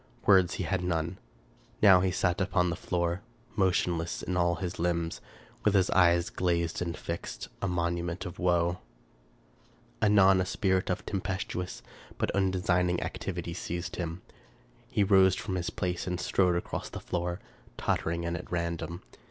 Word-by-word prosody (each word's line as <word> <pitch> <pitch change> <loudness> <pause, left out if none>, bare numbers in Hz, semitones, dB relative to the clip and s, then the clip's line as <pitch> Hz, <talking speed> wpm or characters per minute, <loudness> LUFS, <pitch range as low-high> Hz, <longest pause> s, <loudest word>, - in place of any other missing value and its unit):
Words 95 -3 +5
he - - -2
had 90 +1 -1
none. 85 0 -1 0.6
Now 95 -4 +8
he 95 - +2
sat 90 0 0
upon 90 -2 +2
the - - -2
floor, 85 0 -1 0.3
motionless 90 -4 +1
in 90 - -2
all 85 -1 +2
his 90 -1 -5
limbs, 85 -1 -1 0.4
with 105 -1 +3
his 95 -2 +3
eyes 85 -2 +4
glazed 85 -2 0
and 85 -1 -2
fixed, 85 0 -5
a - - 0
monument 85 +1 -1
of 90 0 -7
woe. 85 0 +2 1.2
Anon 95 -3 +6
a - - 0
spirit 95 -1 +1
of 90 - -2
tempestuous 95 -2 -3 0.3
but - - 0
undesigning 90 -2 +1
activity 85 -2 -4
seized 85 0 -4
him. 85 0 -4 0.7
He 115 -5 +2
rose 95 -2 +5
from 100 0 -4
his 90 -2 -1
place 90 0 -3
and 90 -1 -2
strode 90 -1 +2
across 85 - -3
the - - -6
floor, 90 +1 -3 0.4
tottering 85 +1 -1
and 85 0 -1
at 90 - -7
random. 85 0 -3
90 Hz, 150 wpm, -29 LUFS, 85-95 Hz, 1.2 s, Now